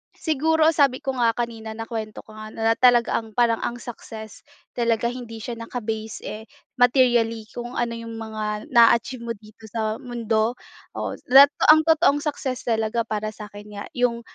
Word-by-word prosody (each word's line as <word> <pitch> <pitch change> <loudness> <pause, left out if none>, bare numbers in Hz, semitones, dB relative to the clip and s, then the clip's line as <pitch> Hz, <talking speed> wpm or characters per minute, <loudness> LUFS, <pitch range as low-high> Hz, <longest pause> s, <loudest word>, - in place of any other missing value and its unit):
siguro, 320 +1 +2
sabi 280 -5 +2
ko 270 - -1
nga 230 -1 +3
kanina, 225 -2 -4
nakuwento 225 -1 -6
ko 220 - -16
nga, 215 0 -8
na 225 0 +2
talaga 245 -2 +4
ang 220 -2 -12
parang 235 -2 +3
ang 240 - -3
success 220 -3 -9 0.3
talaga, 235 -1 0
hindi 230 -3 -8
siya 240 -2 -5
naka-base, 220 -2 -5
eh, 215 +2 -6 0.4
materially 240 -3 +3
kung 240 +1 -7
ano 240 -1 -1
yung 230 0 -8
mga 215 +2 -5
na-a-achieve 235 0 +4
mo 230 - -2
dito 215 +1 -17
sa 220 0 -2
mundo. 230 -3 -1 0.4
Oo, - - -4
dat 275 +3 +9 0.2
ang 310 0 +8
totoong 320 -2 +3
success 270 -4 -3
talaga, 225 0 0
para 215 -1 -4
sa'kin 210 -1 -11
nga, 205 - -5
yung, 240 -1 0
230 Hz, 165 wpm, -23 LUFS, 220-245 Hz, 0.4 s, dat